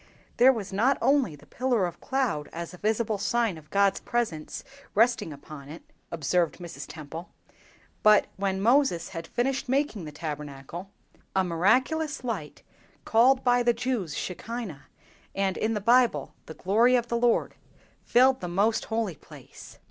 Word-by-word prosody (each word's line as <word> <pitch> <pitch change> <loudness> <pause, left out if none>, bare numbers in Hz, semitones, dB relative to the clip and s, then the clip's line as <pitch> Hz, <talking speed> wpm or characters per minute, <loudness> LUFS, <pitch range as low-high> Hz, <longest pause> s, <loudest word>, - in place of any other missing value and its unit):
"There 255 +2 +7
was 205 -6 -5
not 245 +8 +3
only 270 - +2
the 145 0 -18
pillar 245 - 0
of 175 - -6
cloud 255 - -1
as 170 +1 -6
a 180 - -12
visible 215 0 0
sign 230 -1 +1
of 155 -1 -14
God's 200 -1 +2
presence 220 -11 -3 0.3
resting 230 -5 +3
upon 145 0 -11
it," 160 +3 -10 0.3
observed 170 +2 0
Mrs. 175 -2 -8
Temple, 160 +2 -8 0.7
"but 215 -1 +6
when 190 -1 -1
Moses 235 - +3
had 165 -3 -7
finished 255 +4 -1
making 260 - 0
the 150 - -7
Tabernacle, 150 +3 -7 0.5
a 190 - +3
miraculous 260 - +1
light, 215 -12 -5 0.4
called 255 +4 +4
by 245 -1 +4
the 240 0 +3
Jews, 230 - -2
'Shekinah,' 185 - -5 0.5
and, 195 -1 0
in 220 +1 -1
the - - 0
Bible, 240 +4 +3
'the 160 - -8
glory 225 +7 +3
of 240 -1 +1
the 235 - -1
Lord,' 235 0 +2 0.5
filled 260 +2 +4
the 180 - -3
most 200 +6 +1
holy 220 -6 -2
place." - - -14
210 Hz, 155 wpm, -27 LUFS, 170-245 Hz, 0.7 s, There